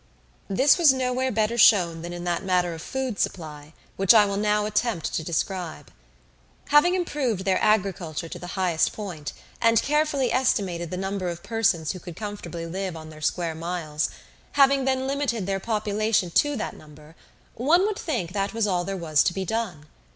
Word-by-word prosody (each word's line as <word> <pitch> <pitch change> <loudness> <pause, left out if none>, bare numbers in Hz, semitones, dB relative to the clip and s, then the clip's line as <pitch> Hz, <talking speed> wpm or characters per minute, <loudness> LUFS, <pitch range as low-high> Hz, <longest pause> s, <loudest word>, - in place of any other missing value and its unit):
This 265 - +4
was 325 -5 +7
nowhere 260 0 0
better 220 +2 0
shown 175 -7 +5
than 170 +1 -6
in 175 0 -6
that 175 0 -1
matter 180 -2 +1
of 160 - -8
food 260 -2 -4
supply, 150 -4 -4 0.3
which 195 +3 +5
I 210 -2 +7
will 200 -1 -2
now 210 +1 +1
attempt 210 -4 -1
to 160 - -1
describe. 165 -3 -3 0.8
Having 295 +5 +5
improved 270 - -1
their 190 -1 +2
agriculture 185 -6 0
to 175 - -8
the 175 +3 -7
highest 180 -4 +1
point, 175 -9 -6 0.3
and 230 -1 +5
carefully 295 -3 +1
estimated 190 -10 0
the 180 - -4
number 190 -1 -2
of 170 0 -7
persons 195 -9 +1
who 185 - -7
could 175 -2 -9
comfortably 175 -5 -6
live 185 0 -4
on 155 0 -10
their 155 0 -13
square 165 +1 -1
miles; 160 -2 -3 0.4
having 275 -1 +4
then 260 0 0
limited 270 -7 -1
their 195 0 -1
population 210 -3 0
to 290 +10 +2
that 235 - -4
number, 150 +1 -15 0.4
one 320 - +3
would 425 -1 -2
think 230 - -3
that 200 +2 -2
was 225 -2 +1
all 180 -3 0
there 195 +1 -4
was 155 -4 +2
to - - +2
be 190 -1 -2
done. 190 -8 -3
195 Hz, 180 wpm, -25 LUFS, 170-235 Hz, 0.8 s, was